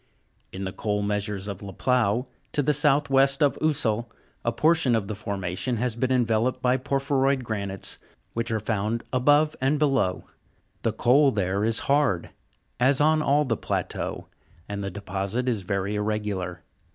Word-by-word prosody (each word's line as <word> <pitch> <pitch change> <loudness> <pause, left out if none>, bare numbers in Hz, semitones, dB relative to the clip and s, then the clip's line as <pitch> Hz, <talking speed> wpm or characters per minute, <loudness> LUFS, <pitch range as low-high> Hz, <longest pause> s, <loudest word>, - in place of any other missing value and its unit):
In 95 - -6
the 95 - -3
coal 105 -1 -1
measures 105 -1 -2
of 100 -3 -6
La 100 -1 -8
Pleau, 125 +1 +1 0.3
to 145 - +1
the 150 - +2
south 145 0 +2
west 135 +2 +4
of 145 - +3
Ussel, 120 -7 0 0.3
a 115 - +1
portion 155 -1 +3
of 105 -3 -1
the 110 - -3
formation 100 +3 -3
has 120 0 -1
been 130 +2 0
enveloped 120 -1 +1
by 125 0 +2
porphyroid 135 0 +1
granites, 100 -4 -4 0.3
which 115 +1 -2
are 110 -1 0
found 110 +1 -1
above 145 +4 +3
and 135 +3 +2
below. 135 -11 +1 0.3
' - - -41
The - - +1
coal 140 +4 +4
is 130 - -4
there 100 +3 +1
hard, 140 - +1 0.5
as 130 +2 +4
on 155 +1 +4
all 150 0 +3
the 115 -4 0
plateau, - - -3 0.4
and 100 0 -4
the 100 - -2
deposit 100 +5 -3
is 115 -5 0
very 100 +2 -2
irregular. 105 -4 -2
115 Hz, 165 wpm, -25 LUFS, 100-135 Hz, 0.5 s, west